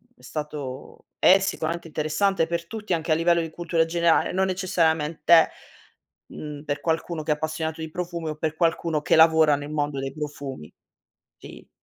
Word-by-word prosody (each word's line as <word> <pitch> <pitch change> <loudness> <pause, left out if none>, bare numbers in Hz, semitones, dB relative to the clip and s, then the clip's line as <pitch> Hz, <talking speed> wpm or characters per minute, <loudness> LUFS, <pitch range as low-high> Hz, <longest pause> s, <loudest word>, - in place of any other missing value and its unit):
è - - -25
stato 150 -4 -7
è 190 - +7
sicuramente 170 -3 -3
interessante 160 +4 0
per 170 0 -3
tutti, 215 -1 -4
anche 165 0 -1
a - - +5
livello 170 +1 +3
di 165 - -4
cultura 165 0 0
generale, 170 0 +2
non 190 +1 +1
necessariamente, 165 -4 +3 0.8
mhmm, 150 -1 -8
per 145 -1 -3
qualcuno 160 0 -2
che 150 - -1
è - - +6
appassionato 160 +1 -4
di 160 - -5
profumi 170 -1 -4
o 155 - -4
per 155 0 -2
qualcuno 165 -2 0
che - - +2
lavora 160 -2 +6
nel 145 +1 -7
mondo 145 -2 -2
dei 135 0 -4
profumi, 140 - -7 0.7
sì. - - -13
160 Hz, 170 wpm, -24 LUFS, 150-170 Hz, 0.8 s, è